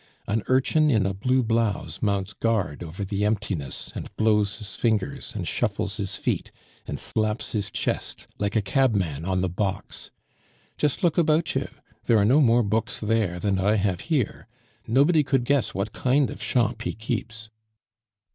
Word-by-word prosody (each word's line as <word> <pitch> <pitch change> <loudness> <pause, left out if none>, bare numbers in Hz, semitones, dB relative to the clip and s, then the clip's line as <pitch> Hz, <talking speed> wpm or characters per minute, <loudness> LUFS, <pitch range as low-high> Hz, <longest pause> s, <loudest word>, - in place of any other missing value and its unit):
An 110 +2 0
urchin 140 +4 +3
in 110 -8 +3
a 95 - 0
blue 125 +6 +1
blouse 115 -2 -1
mounts 100 -2 0
guard 100 -11 -1
over 85 +4 -5
the 100 +1 -2
emptiness, 105 -8 -2
and - - -6
blows 105 -2 +2
his 105 -2 -6
fingers, 110 - -1
and - - -3
shuffles - - -1
his - - -2
feet, - - -2 0.4
and - - -3
slaps 110 0 -1
his 100 -3 -1
chest, - - -3
like 100 +1 -1
a 110 - +2
cabman 95 - +1
on 95 -1 0
the 95 - +1
box. 95 +2 -3 0.7
Just 150 +2 -1
look 175 -1 +3
about 160 0 +2
you! - - -1 0.4
there 115 - +4
are 100 - +4
no 135 +8 +5
more 120 -2 +4
books 110 +2 -1
there 110 -5 0
than 95 +1 0
I 105 +3 +3
have 95 -4 0
here. 150 -9 -1 0.4
Nobody 145 +7 +4
could 135 -3 +1
guess 140 -1 +1
what 100 +2 -2
kind 130 +2 +2
of - - -8
shop 115 -2 +1
he 120 - -2
keeps." 110 0 -4
110 Hz, 170 wpm, -25 LUFS, 100-125 Hz, 0.7 s, no